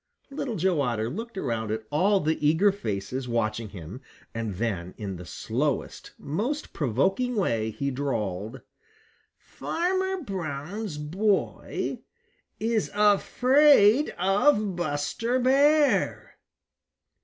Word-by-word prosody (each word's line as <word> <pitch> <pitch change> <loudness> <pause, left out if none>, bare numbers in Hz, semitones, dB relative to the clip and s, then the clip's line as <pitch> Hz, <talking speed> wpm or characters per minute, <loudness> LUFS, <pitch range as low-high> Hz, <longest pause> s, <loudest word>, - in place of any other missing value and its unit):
Little 275 -4 -3
Joe 180 -4 +1
Otter 120 -3 -1
looked 225 - -6
around 115 - -2
at 110 +1 -2
all 195 +7 +3
the 155 -2 -1
eager 165 +7 +4
faces 125 - -4
watching 115 -2 -1
him, 95 - -9 0.3
and 115 -4 -3
then 95 -4 -3
in 100 -4 -5
the 90 0 -10
slowest, 130 - -3
most 235 - -3
provoking 190 - 0
way, 115 - 0
he 140 +5 -3
drawled: 115 -4 -3 0.8
"Farmer 375 +1 -2
Brown's 180 - -5
boy 190 +7 -1 0.6
is 225 -1 0
afraid 250 +4 +5
of 200 +2 +2
Buster 175 - -1
Bear." 285 +4 +3
160 Hz, 105 wpm, -26 LUFS, -, 0.8 s, afraid